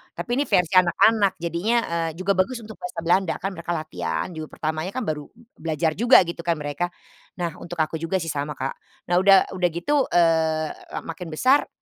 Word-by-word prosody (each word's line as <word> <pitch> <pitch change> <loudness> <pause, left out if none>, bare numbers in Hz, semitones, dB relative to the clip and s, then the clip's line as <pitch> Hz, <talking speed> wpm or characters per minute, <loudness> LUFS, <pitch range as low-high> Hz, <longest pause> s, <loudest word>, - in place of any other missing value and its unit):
Tapi 240 - -2
ini 280 - +2
versi 180 0 +2
anak-anak, 200 +3 +4
jadinya, 170 +7 -1 0.2
eee, 165 -1 0
juga 190 +2 +1
bagus 240 +6 +1
untuk 220 0 -10
bahasa 180 -1 -5
Belanda, 175 0 +2
kan 195 - -3
mereka 170 0 -5
latihan 85 - -3
juga 155 -1 -6
pertamanya 155 +4 -3
kan 255 - -1
baru 150 -6 -3
b 235 - -22 0.2
belajar 160 0 0
juga 240 0 +6
gitu 170 - -6
kan 170 0 +1
mereka. 145 +4 -2 0.5
Nah, 170 -1 -1
untuk 175 - -7
aku 155 - -5
juga 165 +3 -2
sih 165 -2 -3
sama, 145 +1 -3
Kak. 135 - -3 0.4
Nah - - +4
udah 195 +1 +7 0.2
udah 180 -1 +2
gitu, 175 +12 -3 0.2
eee, 160 -2 +2 0.2
la - - -1
makin 165 +1 -7
besar 255 - +3
170 Hz, 200 wpm, -24 LUFS, 160-190 Hz, 0.5 s, udah